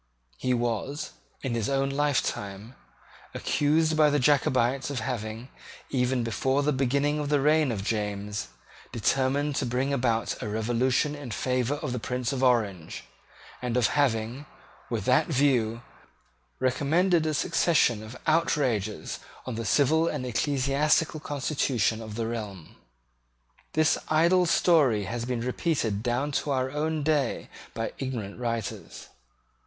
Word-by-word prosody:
He 130 - 0
was, 120 +5 -2 0.3
in 130 -3 -2
his 115 -1 -1
own 135 0 +1
lifetime, 120 -7 -1 0.6
accused 155 +2 +2
by 155 -1 +5
the 145 - +2
Jacobites 130 -2 +2
of 140 -3 -2
having, 115 0 -4 0.4
even 125 -1 +1
before 130 +5 0
the 150 +1 +2
beginning 140 +3 +1
of 145 -1 -2
the 145 -1 +3
reign 150 -1 +3
of 100 -4 -3
James, 105 - -2 0.4
determined 135 +5 +1
to 140 - 0
bring 130 +3 0
about 120 -4 0
a 105 - -3
revolution 120 +6 +1
in 145 -4 -7
favour 125 +4 0
of 145 - -4
the 125 - -2
Prince 125 +1 -2
of 130 - -2
Orange, 105 -10 +1 0.6
and 125 -1 -1
of 120 - +3
having, 130 0 0 0.4
with - - -2
that - - +3
view, 120 -4 +1 0.8
recommended 160 +6 +2
a 155 - 0
succession 150 -8 +2
of 110 +3 -9
outrages 130 - 0 0.3
on 130 - -4
the 115 0 -4
civil 155 +7 +3
and 145 -6 -2
ecclesiastical 140 +5 +1
constitution 135 -6 0
of 110 -1 -7
the 115 0 -2
realm. 105 -7 -6 1.0
This 155 0 +3
idle 170 +3 +4
story 145 - +4
has 115 +4 -4
been 125 -2 -2
repeated 125 -4 -1
down 125 +5 -1
to - - -6
our 130 -1 0
own 155 +1 -1
days 150 -2 0 0.3
by 115 0 -3
ignorant 120 -6 -4
writers. 115 -4 -4
130 Hz, 140 wpm, -27 LUFS, 115-145 Hz, 1.0 s, by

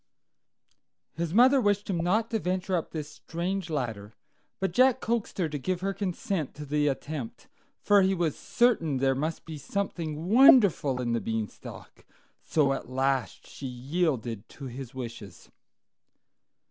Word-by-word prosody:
His 165 0 -3
mother 255 +7 +6
wished 205 -2 +1
him 185 -4 -1
not 215 +7 +1
to 225 - +1
venture 185 0 -1
up 165 - -2
this 155 -2 -5
strange 175 +4 -4
ladder, 115 -8 -4 0.4
but 190 - -1
Jack 255 0 +4
coaxed 230 -2 -2
her 180 -4 +1
to 150 -1 -5
give 180 +5 -2
her 195 +1 -1
consent 185 -4 -3
to 150 - -7
the 150 +1 +1
attempt, 140 -2 -4 0.4
for 205 -1 +5
he 190 0 +2
was 170 -4 0
certain 205 - +1
there 135 0 +2
must 155 +5 -3
be 160 -2 -7
something 165 -1 -3
wonderful 200 - +6
in 120 -2 -1
the 115 - 0
Beanstalk; 110 -2 -6 0.4
so 140 -3 +2
at 135 - -6
last 130 -1 -1
she 135 - -8
yielded 125 - -2
to 140 - -10
his 130 0 -8
wishes. 115 -7 -8
160 Hz, 150 wpm, -28 LUFS, 135-195 Hz, 0.4 s, mother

